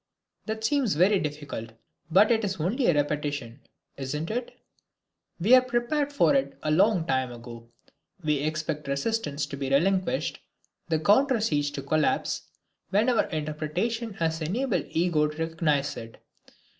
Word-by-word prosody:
That 220 0 -3
seems 260 - +1
very 190 +5 +4
difficult, 145 -8 -5 0.4
but 200 +7 +5
it 225 -1 +2
is 195 -2 -1
only 220 - 0
a - - +5
repetition, 145 -4 -2 0.4
isn't 150 +5 -3
it? 240 +2 -4 0.8
We 205 +9 +4
were 255 - +9
prepared 255 +4 -1
for 285 0 +3
it 275 -1 0
a 155 - 0
long 185 +1 +3
time 130 -5 0
ago. 115 -1 -10 0.5
We 150 -2 +1
expect 155 0 -3
resistance 145 0 -1
to 140 0 -7
be 135 -1 -3
relinquished, 190 - +1 0.5
the 160 -1 +2
counter 245 - +4
siege 150 -9 +1
to 140 - -5
collapse, 155 +2 0 0.4
when 210 +6 +3
our 240 -3 +3
interpretation 160 +9 -3
has 160 -1 -1
enabled 190 - -1
the - - -3
ego 165 -3 +2
to 150 0 -8
recognize 160 -3 0
it. 115 0 -9
160 Hz, 150 wpm, -27 LUFS, 145-220 Hz, 0.8 s, were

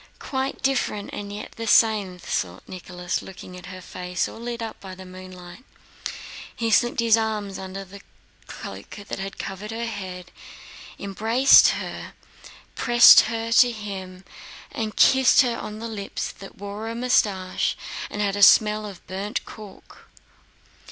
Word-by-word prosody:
"Quite 265 0 -4
different 250 -6 -1
and 205 0 -6
yet 205 +1 -7
the 230 0 -5
same," 210 -5 +3
thought 95 - -4
Nicholas, 180 -1 -5
looking 185 -1 -11
at 180 -1 -11
her 185 -1 -9
face 180 0 -3
all - - -10
lit 235 0 -5
up 225 -1 -6
by 190 -1 -9
the 190 0 -11
moonlight. 185 +3 -11 0.9
He 230 -1 -1
slipped 240 +2 +3
his 230 -1 +5
arms 215 -3 -2
under 190 +1 -7
the 195 +2 -13 0.5
cloak - - -9 0.2
that 195 0 -5
covered 195 +2 -6
her 230 +1 -3
head, 185 -5 -7 0.7
embraced 225 +7 +5
her, - - -6 0.6
pressed 240 -1 +8
her 230 0 -3
to 245 +1 +6
him, 190 -4 -8 0.5
and 220 -2 -4
kissed 265 0 +6
her 245 -3 0
on 215 -2 -6
the 230 +1 -6
lips 210 -3 -5
that 195 - -13
wore 205 +3 -6
a 230 - -5
mustache 205 -6 +1 0.3
and 210 - -2
had 200 -1 0
a 205 - -2
smell 210 +1 +6
of 195 -4 -11
burnt 195 +3 -4
cork. 210 -3 -13
205 Hz, 150 wpm, -24 LUFS, 185-230 Hz, 0.9 s, pressed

